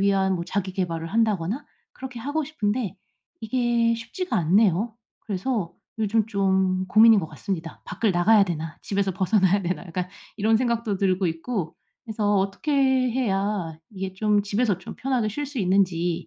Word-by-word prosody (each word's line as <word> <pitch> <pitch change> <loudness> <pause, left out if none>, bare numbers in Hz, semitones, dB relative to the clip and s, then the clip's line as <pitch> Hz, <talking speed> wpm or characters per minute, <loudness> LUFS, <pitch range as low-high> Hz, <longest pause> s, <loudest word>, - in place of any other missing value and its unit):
위한 195 -1 +2
뭐 170 - -3
자기 190 +1 -2
계발을 170 -3 -2
한다거나 220 - 0 0.3
그렇게 255 -2 -8
하고 290 +5 -1
싶은데 220 - -2 0.4
이게 235 0 +1
쉽지가 230 +11 -4
않네요. 200 +5 +2 0.2
그래서 200 -2 -2 0.3
요즘 215 0 +2
좀 190 -3 +1
고민인 220 0 +7
것 160 - -5
같습니다. 165 +1 -5
'밖을 220 -3 0
나가야 200 +4 +5
되나? 165 -3 -4
집에서 195 -1 -1
벗어나야 195 +1 +2
되나?' 180 +3 -3
약간 180 +1 -3 0.3
이런 220 +1 +3
생각도 235 -3 0
들고 185 -2 +1
있고 165 +1 -4 0.3
그래서 210 -3 0
어떻게 195 +10 -1
해야 225 - +1
이게 190 -2 -5
좀 210 +1 +2
집에서 205 -1 0
좀 180 - -9
편하게 255 -4 0
쉴 290 +8 -3
수 275 -1 -6
있는지 180 -3 +1
200 Hz, 340 characters per minute, -24 LUFS, 185-230 Hz, 0.4 s, 고민인